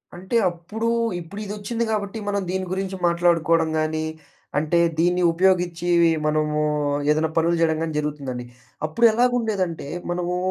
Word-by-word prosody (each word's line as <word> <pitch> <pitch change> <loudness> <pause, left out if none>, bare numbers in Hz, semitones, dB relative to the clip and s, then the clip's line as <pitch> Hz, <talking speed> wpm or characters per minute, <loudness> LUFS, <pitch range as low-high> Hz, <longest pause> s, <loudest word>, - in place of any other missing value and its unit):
అంటే, 190 +6 -5 0.2
అప్పుడూ, 210 +7 -5 0.3
ఇప్పుడిదొచ్చింది 205 +5 -4
గాబట్టి, 210 0 -2
మనం 200 0 0
దీని 190 0 -1
గురించి 190 0 -2
మాట్లాడుకోడం 170 -1 +2
గానీ, 155 0 -1 0.5
అంటే, 155 +3 +2 0.2
దీన్ని 175 +2 +2
ఉపయోగిచ్చేవి 175 -1 +2 0.2
మనమూ 150 0 +1 0.5
ఏదన్నా 155 +1 +1
పనులు 170 +1 +3
జేయడం 160 -1 +2
గానీ 160 -1 -3
జరుగుతుందండి. 140 -5 -4 0.4
అప్పుడెలాగుండేదంటే, 220 - +1 0.2
మనమూ 180 0 -1
175 Hz, 115 wpm, -23 LUFS, 160-195 Hz, 0.5 s, పనులు